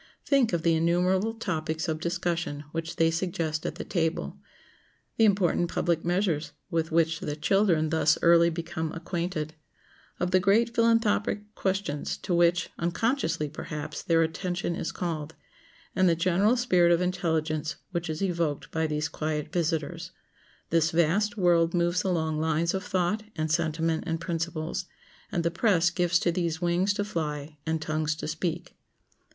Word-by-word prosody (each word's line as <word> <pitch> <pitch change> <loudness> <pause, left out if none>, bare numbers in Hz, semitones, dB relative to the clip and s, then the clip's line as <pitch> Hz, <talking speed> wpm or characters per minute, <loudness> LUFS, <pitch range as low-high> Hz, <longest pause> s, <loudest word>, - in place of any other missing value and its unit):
Think 270 -5 +3
of 170 -2 -1
the 170 - +4
innumerable 180 +6 +2
topics 160 -7 -2
of 155 -1 -1
discussion 170 -3 -2
which 165 0 -4
they 165 0 +3
suggest 165 -2 -2
at - - -4
the - - -5
table; 165 -3 -2 0.8
the 225 - +5
important 185 -4 +2
public 170 -2 0
measures 170 -4 0 0.2
with 165 -1 0
which 165 0 +2
the 145 - -3
children 170 -1 +2
thus 160 -1 +3
early 170 0 +6
become 165 -1 -4
acquainted; 165 -2 -3 0.7
of 180 0 0
the 185 - +5
great 220 +5 +3
philanthropic 215 -2 +1
questions 190 -7 -2
to 180 - -3
which, 175 0 +3
unconsciously 170 - 0
perhaps, 150 0 -6
their 165 -1 +3
attention 175 +1 -2
is 165 - -3
called, 160 -3 -4 0.6
and 185 -1 +4
the 165 - +3
general 185 +8 +2
spirit 180 -8 +4
of 170 - +4
intelligence 160 -3 -1 0.2
which 170 -2 -3
is 155 +4 -2
evoked 170 -6 -1
by 160 0 0
these 150 0 -1
quiet 155 -1 -3
visitors. 165 +1 -1 0.6
This 165 -1 +3
vast 175 +7 +1
world 170 -2 +3
moves 175 +1 +1
along 160 -4 0
lines 160 +1 +1
of 190 0 -2
thought 185 +2 0
and 155 0 -1
sentiment 160 0 0
and 165 -1 -1
principles, 165 0 -3 0.5
and 170 - 0
the 170 - +1
press 175 -2 +3
gives 175 0 +2
to 175 - +2
these 170 -2 -1
wings 175 +3 +1
to 205 - 0
fly 150 -5 -4
and 160 0 0
tongues 155 0 -1
to 155 - -6
speak. 165 +2 -3
170 Hz, 155 wpm, -27 LUFS, 160-180 Hz, 0.8 s, early